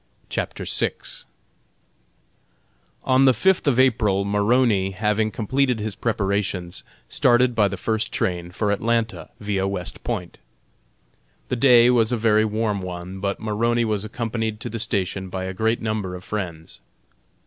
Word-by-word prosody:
CHAPTER - - -3
VI. - - 0 2.1
On 130 +1 +4
the 130 -2 +5
fifth 190 - +2
of 130 -3 +3
April 105 -6 +3
Maroney, 105 0 +2
having 105 +2 +1
completed 125 +3 0
his 105 0 -3
preparations, 100 -5 -2 0.3
started 125 0 +3
by 105 -3 +3
the 100 - -4
first 110 +4 -1
train 85 -1 -2
for 100 +3 -1
Atlanta, 115 +2 -1
via 100 -2 -1
West 95 -3 -5
Point. 95 -8 -4 1.1
The - - 0
day 125 -1 +6
was 115 -2 +3
a 120 - +1
very 110 -1 +3
warm 105 -2 -1
one, 90 +1 -6
but 100 0 -2
Maroney 115 +2 0
was 105 -2 -1
accompanied 110 -1 -3
to - - -5
the 115 - -4
station 95 -4 -2
by 95 0 -4
a 95 0 -4
great 110 +4 0
number 105 -4 -2
of 90 - -9
friends. 90 -7 -6
105 Hz, 145 wpm, -23 LUFS, 95-115 Hz, 2.1 s, day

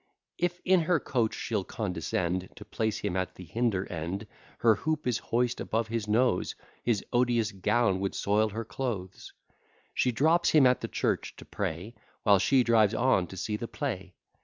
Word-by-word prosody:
If 175 0 0
in 185 -1 +5
her 175 -3 +4
coach 120 -5 0
she'll 110 -4 -2
condescend 90 -2 -2
To 105 - -11
place 110 0 -1
him 100 -3 -3
at 95 0 -2
the 95 - -10
hinder 110 -3 0
end, 85 +5 -4 0.3
Her 115 -1 +5
hoop 155 +6 -2
is 125 -3 +1
hoist 120 +1 0
above 110 0 -1
his 115 -2 -2
nose, 110 -2 +1 0.3
His 115 -4 0
odious 120 -3 +2
gown 105 +1 +1
would 95 0 -2
soil 105 +2 +2
her 110 +2 -5
clothes. 105 -7 -5 0.6
She 125 - +2
drops 160 +8 +3
him 150 -4 +6
at 125 0 +4
the - - -3
church, - - -1
to - - -12
pray, 90 +8 -4 0.3
While 100 -2 +5
she 130 +6 +4
drives 110 -2 +4
on 120 -8 +2
to 95 - -10
see 105 +3 -2
the 115 - -5
play. 95 - -4
110 Hz, 180 wpm, -29 LUFS, 95-125 Hz, 0.6 s, him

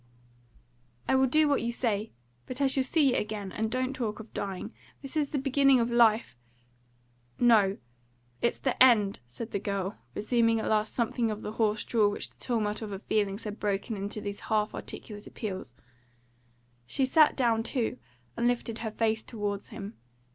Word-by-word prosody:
"I - - +2
will 265 0 +4
do 310 +4 +4
what 285 -1 +2
you 235 - -1
say. 220 -3 -1 0.4
But 255 - -5
I 280 - +3
shall 270 0 +2
see 280 0 +3
you - - +1
again; 210 -2 -3
and 220 +3 -2
don't 255 +2 -1
talk 230 -5 -3
of 220 0 -11
dying. 195 -2 -4 0.3
This 275 +3 -7
is 295 -2 +1
the 290 - -2
beginning 275 -1 +4
of 235 0 0
life 230 - +4 0.6
" 120 0 -37
"No. 200 -3 +4 0.6
It's 235 - +1
the 260 -2 -2
end," 215 -6 +6
said 220 - -7
the 200 - -1
girl, 200 0 -3 0.2
resuming 230 +1 +2
at - - -3
last 215 0 +1
something 235 -1 0
of 215 0 -4
the 210 - -4
hoarse 215 -1 0
drawl 215 -3 +3
which 205 - -5
the - - -25
tumult 215 -3 -1
of 220 - -5
her 195 - -4
feeling 200 -1 0
had 210 -1 -7
broken 205 +2 -1
into 205 +2 -4
those 200 0 -5
half 215 -1 0
articulate 205 -1 -7
appeals. 190 - -6 1.1
She 265 - +1
sat 305 +4 +5
down 230 -4 +2
too, 230 - -2 0.4
and 235 - +1
lifted 235 -2 -1
her 220 - -3
face 220 0 0
towards 205 -3 -4
him. 215 -2 -7
220 Hz, 185 wpm, -29 LUFS, 205-245 Hz, 1.1 s, end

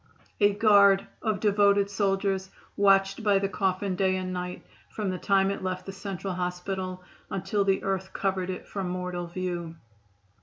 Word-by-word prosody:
A 205 -1 +5
guard 200 -2 +5 0.2
of 215 -3 0
devoted 200 -1 +3
soldiers 195 -1 0 0.3
watched 195 +1 +3
by 205 -2 +4
the 195 0 +1
coffin 190 -1 -1
day 190 0 +2
and 185 0 -3
night 180 0 -5 0.2
from 205 -3 -3
the 185 - -4
time 195 -1 +2
it 200 - -4
left 185 -1 -3
the 195 - -5
Central 195 -1 -5
Hospital 180 +1 -4 0.3
until 200 +2 -1
the 195 -1 +1
earth 190 -1 -2
covered 190 -1 -1
it 185 - -5
from 195 -3 -4
mortal 180 -1 -3
view. 175 -2 -4
195 Hz, 160 wpm, -27 LUFS, 185-200 Hz, 0.3 s, A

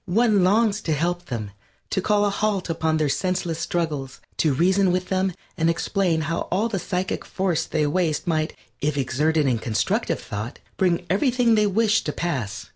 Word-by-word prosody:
One 210 0 +3
longs 210 +2 +3
to 160 - -1
help 175 +4 -1
them; 110 -8 -5 0.4
to 190 - +1
call 205 +1 +2
a 205 - +1
halt 200 -4 -1
upon 160 -1 0
their 155 -1 +1
senseless 175 +1 -1
struggles; 155 -6 -2 0.2
to 155 - +3
reason 185 +6 +3
with 180 0 -1
them 190 0 +1 0.2
and 165 0 +2
explain 170 -1 +1
how 165 +2 -2
all 210 +6 +1
the 200 -4 -2
psychic 180 +2 -2
force 175 -4 -1
they 155 -2 0
waste 155 0 0
might, 155 -2 0 0.2
if 145 0 -1
exerted 150 +4 +1
in 125 -4 +1
constructive 110 -1 0
thought, 105 +5 -6 0.2
bring 175 -2 +1
everything 240 +3 +2
they 210 -1 +4
wish 220 +2 +2
to 150 - -1
pass. 130 - -3
175 Hz, 180 wpm, -24 LUFS, 155-195 Hz, 0.4 s, they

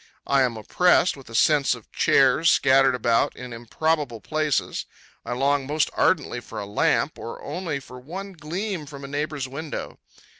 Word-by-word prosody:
I 140 -1 +3
am 125 -3 +1
oppressed 180 - +3
with 135 -4 -14
a 115 - -8
sense 145 +1 +4
of 115 - -16
chairs, 135 +4 +4
scattered 135 -1 +4
about 115 -1 +1
in 125 -1 -8
improbable 125 +2 -1
places. 155 +4 -1 0.4
I - - -4
long 135 +1 +1
most 150 +1 +1
ardently 145 -8 +1
for 115 -2 -8
a 100 - -4
lamp, 100 - +1
or - - -7
only 170 -6 -3
for 125 -1 -12
one 190 +9 -7
gleam 175 +1 -4
from 140 -1 -10
a - - -6
neighbor's 145 -1 -3
window. 145 +3 -6
140 Hz, 165 wpm, -24 LUFS, 125-155 Hz, 0.4 s, sense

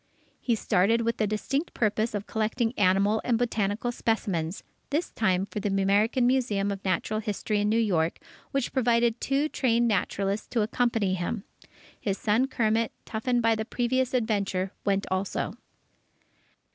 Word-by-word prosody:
He 235 - +1
started 215 +2 +2
with 230 0 -1
the 215 - +1
distinct 275 - -2
purpose 215 0 0
of 205 0 -3
collecting 225 +2 -1
animal 200 +2 +3
and 240 -2 +2
botanical 225 -1 0
specimens, 195 -8 -1 0.3
this 305 +5 -1
time 190 -3 +1
for 210 - -5
the 205 - -1
American 200 +6 +2
Museum 235 -6 +1
of 195 -1 -5
Natural 195 +3 0
History 210 0 -1
in 205 - +1
New 220 - +2
York, 175 -8 +1 0.3
which 275 -2 -2
provided 235 -2 +2
two 280 +2 +1
trained 240 -5 +1
naturalists 200 -1 -1
to 230 -3 0
accompany 225 -3 +1
him. 190 +4 -2 0.6
His 200 -3 -2
son 225 +5 +2
Kermit, 225 -3 +1
toughened 240 +2 -1
by 230 0 +4
the 220 0 -1
previous 255 +2 0
adventure, 200 -5 0
went 195 0 +1
also. 190 +1 -1
220 Hz, 150 wpm, -27 LUFS, 200-235 Hz, 0.6 s, by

